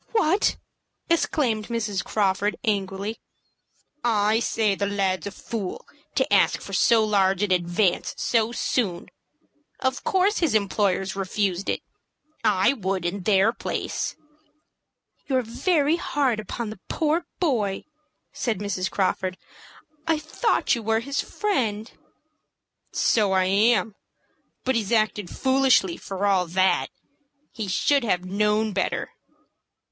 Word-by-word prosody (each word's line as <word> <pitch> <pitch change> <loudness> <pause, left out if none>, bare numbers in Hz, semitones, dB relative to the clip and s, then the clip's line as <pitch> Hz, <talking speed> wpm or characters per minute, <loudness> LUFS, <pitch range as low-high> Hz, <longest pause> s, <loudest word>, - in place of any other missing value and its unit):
"WHAT!" 390 -2 +2 0.5
exclaimed 245 -10 +1
Mrs. 215 -5 -2
Crawford, 205 0 0
angrily. 200 -1 -2 0.8
"I 215 -1 +2
say 220 -3 +1
the 200 +1 -1
lad's 195 -3 -1
a - - -5
fool 205 -2 -5 0.3
to - - +1
ask - - +4
for - - -9
so 225 -2 +4
large 195 -2 +2
an 205 - 0
advance 175 +1 +1
so 230 -1 +1
soon. 205 -7 -1 0.7
Of 260 0 -1
course 385 +2 +2
his 320 -10 +1
employers 195 -2 +1
refused 195 -1 -1
it. - - -1 0.6
I 210 +2 +3
would, 190 -7 -2
in 190 +3 -2
their 200 +3 +3
place." - - -3 1.1
"You're 260 -2 +1
very 300 - +1
hard 270 -9 0
upon 215 +1 -5
the 215 - -10
poor 325 +2 0
boy!" 220 - 0 0.5
said 230 -5 -1
Mrs. 190 -2 -2
Crawford. 185 -1 -1 0.7
"I 325 -1 +3
thought 310 +10 0
you 235 - -1
were 225 +1 +1
his 280 +4 -2
friend." 230 - -2 1.0
"So 210 -4 +2
I 190 0 +3
am; 210 +2 +3 0.7
but 260 - +1
he's 225 -4 -1
acted 215 -4 +1
foolishly 260 -9 +3
for 195 +1 -4
all 190 -3 +2
that. 185 +1 +2 0.7
He 220 -3 -4
should 275 +8 +2
have 180 -5 0
known 210 +3 +1
better." 190 - -1
210 Hz, 125 wpm, -24 LUFS, 195-240 Hz, 1.1 s, ask